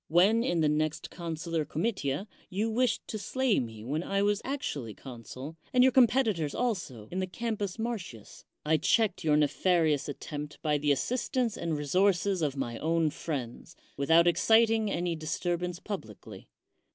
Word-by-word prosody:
When, 195 +8 +4
in 175 -8 +1
the 155 - +3
next 150 +1 -1
consular 165 -1 -3
comitia, 160 +1 -2 0.2
you 210 +4 -1
wished 240 0 0
to 215 - -4
slay 260 +1 +1
me 110 -3 -6
when 145 +7 -2
I 195 +2 0
was 205 0 +1
actually 145 - -4
consul, 130 +4 -9
and 250 0 +5
your 260 - +6
competitors 230 - +3
also, 175 - -2
in 185 - -2
the 185 - -1
Campus 210 -1 -3
Martins, 210 - -6 0.2
I 155 +1 +3
checked 220 +2 +2
your 150 -2 +3
nefarious 150 0 +2
attempt 145 +1 -6
by 150 -2 +1
the 145 0 +2
assistance 240 - 0
and 165 -3 -2
resources 185 +5 +2
of 145 -3 -1
my 120 -4 -3
own 165 -1 +1
friends, 135 -7 -5 0.2
without 160 +4 +4
exciting 220 +4 +4
any 175 -2 -1
disturbance 175 +3 -2
publicly. 145 - -8
170 Hz, 150 wpm, -29 LUFS, 150-210 Hz, 0.2 s, your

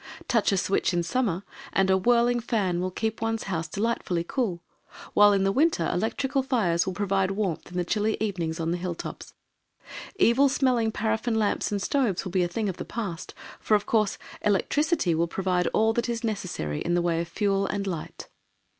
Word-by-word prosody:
Touch 230 -4 +2
a 195 - +2
switch 190 -1 +1
in 175 - +1
summer 195 -2 -1 0.3
and 190 0 +3
a - - +5
whirling 240 +4 +3
fan 200 -7 0
will 185 - -1
keep 220 +4 -3
one's 225 0 -1
house 165 -4 -3
delightfully 190 -2 -1
cool, 180 -4 -2 0.5
while 205 0 +7
in 195 -1 +2
the 195 - +2
winter 275 - +2
electrical 265 +8 0
fires 200 -10 +1
will 190 - -1
provide 195 -1 +1
warmth 195 -4 -2
in 180 - -5
the 175 - 0
chilly 215 +3 0
evenings 175 -7 -2
on 165 0 -1
the 175 - 0
hill 175 -1 -3
tops. - - -8 0.8
Evil 275 - +4
smelling 250 -5 +2
paraffin 225 +2 -1
lamps 215 -1 0
and 200 -1 -1
stoves 235 -10 0
will 185 - -4
be 185 0 +2
a 175 - +2
thing 210 +5 -2
of 185 - -3
the - - -4
past, 200 -8 -5 0.2
for, 215 - +2
of 205 - 0
course, 215 -3 +1 0.2
electricity 290 - +1
will 165 +1 +1
provide 180 0 0
all 220 +1 +2
that 235 +1 -1
is 235 0 -2
necessary 185 - -3
in 175 - 0
the 175 - +2
way 170 -1 +1
of 170 - -4
fuel 195 0 0
and 200 -1 -2
light. 175 -5 -5
200 Hz, 200 wpm, -26 LUFS, 180-225 Hz, 0.8 s, while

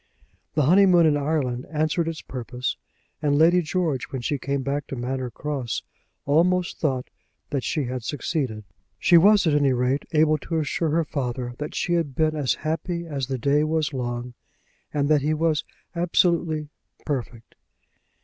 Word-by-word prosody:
The 150 - +3
honeymoon 180 +2 +6
in 155 -2 +4
Ireland 140 -4 -1
answered 155 +2 0
its 165 -1 -4
purpose, 125 0 -4 0.5
and 145 -2 +2
Lady 170 +3 +5
George, 160 -5 -1
when 130 -3 -6
she 145 +2 -1
came 140 0 -2
back 140 +2 -2
to - - -5
Manor 130 +1 -3
Cross, 135 -1 -4 0.4
almost 175 +5 +2
thought 130 -5 -1 0.4
that 140 -3 -1
she 150 - -1
had 125 -1 -4
succeeded. 130 -4 -2 0.3
She 175 - +4
was 200 +4 +6
at 160 - +3
any 140 -2 +3
rate 125 +3 0
able 155 -1 +3
to 165 +3 -3
assure 160 +2 0
her 165 +2 +1
father 125 -4 -3
that 150 +1 -5
she 175 - 0
had 160 -6 0
been 155 +1 +1
as 140 -4 +1
happy 170 +2 -2
as 140 -5 -3
the 135 -1 -2
day 140 +4 +2
was 155 -1 0
long, 120 -1 -4 0.6
and 145 -1 0
that 150 -1 +4
he 155 +2 +1
was 155 -1 +1 0.3
absolutely 170 -3 +1 0.4
"perfect." 125 -5 -4
150 Hz, 165 wpm, -24 LUFS, 130-160 Hz, 0.6 s, honeymoon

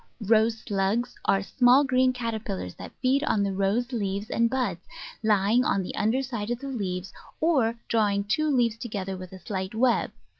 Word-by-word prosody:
Rose 220 +1 +3
Slugs 210 +4 0
are 195 0 +2
small 250 +6 +4
green 255 -1 +3
caterpillars 220 - -4
that - - -10
feed 270 +3 +3
on 210 -8 +1
the 200 -1 -1
Rose 200 +6 0
leaves 200 -3 -3
and 230 0 +2
buds, 245 -10 -1 0.4
lying 215 +2 +3
on 200 -6 +1
the - - -6
under 225 +5 +1
side 235 -5 -4
of 240 - -1
the 275 +3 -7
leaves, 195 -7 -4 0.3
or 265 -9 +2
drawing 205 -3 +1
two 240 +10 0
leaves 240 -5 +2
together 195 -5 -4
with 185 -1 -9
a 190 - -9
slight 190 +1 -5
web. 240 +1 +2
220 Hz, 180 wpm, -26 LUFS, 195-245 Hz, 0.4 s, small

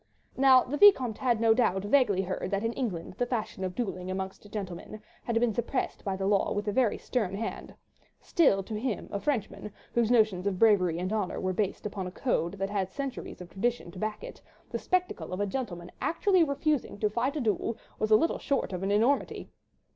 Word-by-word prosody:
Now 260 -1 +6
the 290 +4 -3
Vicomte 265 - +6
had 240 -4 +1
no 225 -1 +5
doubt 195 -5 +1
vaguely 205 -4 +3
heard 185 0 -3
that 200 +1 -1
in 230 +1 0
England 190 -11 -3
the 245 - +1
fashion 220 -5 -3
of 185 -1 -3
duelling 185 -6 -3
amongst 190 +2 -5
gentlemen 195 0 -6 0.3
had 230 -1 +1
been 235 -2 +2
suppressed 240 +4 -2
by 195 -2 -1
the 190 0 -3
law 200 0 +2
with 205 +1 -3
a - - +2
very 235 0 +2
stern 210 -7 -2
hand; 225 +3 -5 0.4
still 200 - +3
to 210 +2 -5
him, 240 -2 -3
a 200 - -2
Frenchman, 210 -6 -2 0.2
whose 235 -2 +2
notions 215 -6 +3
of 195 -2 -1
bravery 185 -6 +4
and 185 +4 -2
honour 210 -4 -1
were 185 0 -1
based 200 +1 -2
upon 200 -3 -4
a - - -6
code 180 -5 -1
that 195 0 -3
had 190 -2 -1
centuries 275 -8 -5
of 175 - -9
tradition 230 -2 -2
to 185 - -10
back 215 - -3
it, - - -9 0.3
the - - -2
spectacle 365 - -1
of 185 - -3
a 205 - +1
gentleman 190 -6 -5
actually 370 +1 +3
refusing 285 -4 -1
to 210 - +1
fight 240 +7 -1
a - - -1
duel 220 -1 -1 0.2
was 215 - 0
little 220 +10 +4
short 275 -8 -1
of 180 - -3
an 195 - -1
enormity. 230 +7 +1
215 Hz, 205 wpm, -29 LUFS, 190-245 Hz, 0.4 s, Now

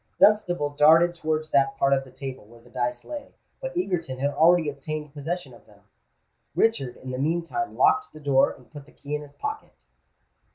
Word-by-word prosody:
Dunstable 180 -7 +4
darted 160 +4 +5
towards 155 -2 -2
that 135 -1 +2
part 135 0 +3
of 135 0 +1
the 130 - -15
table 135 -1 -7
where 115 +2 -17
the 120 +1 -20
dice 125 -1 -2
lay; 290 -2 -8 0.3
but - - -5
Egerton 170 - -2
had 140 +2 0
already 160 +3 +4
obtained 150 +1 -5
possession 150 -1 -4
of 120 - -18
them. 105 -1 -21 0.7
Richard 135 - +1
in 130 - -8
the 130 - -4
meantime 170 - -2
locked 420 +1 +3
the 155 - -12
door, 140 -2 +3
and 125 - -16
put 145 -2 -11
the - - -19
key 145 +1 -8
in 150 - -1
his 145 -1 -12
pocket. - - -5
150 Hz, 195 wpm, -25 LUFS, 135-175 Hz, 0.7 s, darted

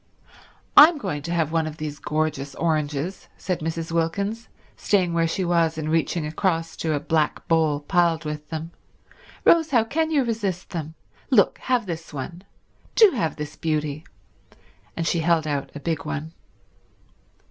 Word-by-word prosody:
"I'm 310 +2 +9
going 150 - -3
to 170 - -5
have 165 -3 0
one 165 -1 +1
of 155 0 -7
these 150 -2 -5
gorgeous 150 -2 -2
oranges," 155 +1 -1
said 180 -2 -2
Mrs. 165 +1 -4
Wilkins, 200 +7 -1 0.3
staying 185 -4 +1
where 165 0 +2
she 185 +3 -1
was 170 -2 +2
and 155 0 -2
reaching 165 0 0
across 165 +1 -1
to 160 -2 -1
a - - 0
black 155 0 0
bowl 160 -3 +2
piled 170 0 +1
with 150 0 -5
them. 160 +1 -5 0.7
"Rose, 325 -2 +5
how 240 -6 +4
can 315 +7 -1
you 295 -4 +2
resist 205 -6 -3
them. 160 -2 -5 0.3
Look—have 250 -3 +2
this 165 -2 -6
one. 165 +5 -6 0.5
Do 435 -4 +7
have 215 - -1
this 150 -1 -6
beauty—" 155 -1 -2 0.9
And 165 - -1
she 165 +2 +1
held 165 -1 +2
out 145 -2 -2
a - - -5
big 160 0 -2
one. 155 +3 -5
165 Hz, 160 wpm, -24 LUFS, 155-180 Hz, 0.9 s, I'm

